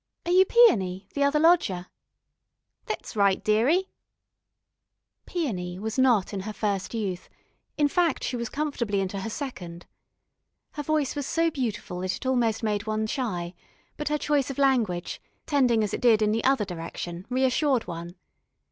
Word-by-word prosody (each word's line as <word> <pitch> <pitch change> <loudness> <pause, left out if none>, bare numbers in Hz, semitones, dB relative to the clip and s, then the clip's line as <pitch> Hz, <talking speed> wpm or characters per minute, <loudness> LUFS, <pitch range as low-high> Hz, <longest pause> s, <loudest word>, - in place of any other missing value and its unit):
"Are 345 - -1
you 370 +1 +6
Peony, 195 - +4
the 285 - -2
other 280 +1 +3
lodger?" 305 - +3 1.0
"Thet's - - -5
right, 200 -2 +2
dearie." 260 - +2 1.4
Peony 185 - -3
was 220 +5 -3
not 240 -7 +3
in 200 - -2
her 215 +3 -5
first 205 0 -2
youth, 190 -5 -3 0.5
in 295 -1 +4
fact 335 -1 +1
she 255 - -2
was 235 -2 -3
comfortably 265 -9 -1
into 195 0 -2
her 195 - -4
second. 180 - -7 0.9
Her 295 - -5
voice 300 -1 0
was 285 -2 -3
so 330 +1 +1
beautiful 220 - -3
that 185 0 -2
it - - -10
almost 235 -4 +1
made 210 -1 -1
one 215 0 0
shy, 195 -9 -3 0.4
but 300 - -5
her 300 - +1
choice 290 -2 0
of 275 - -5
language, 235 -11 +1 0.2
tending 250 -7 +3
as 205 - -3
it - - -3
did 225 -3 +5
in 210 - +2
the 225 +1 0
other 260 -5 +3
direction, 175 +1 -6
reassured 260 0 +1
one. 170 0 -7
225 Hz, 160 wpm, -26 LUFS, 195-280 Hz, 1.4 s, you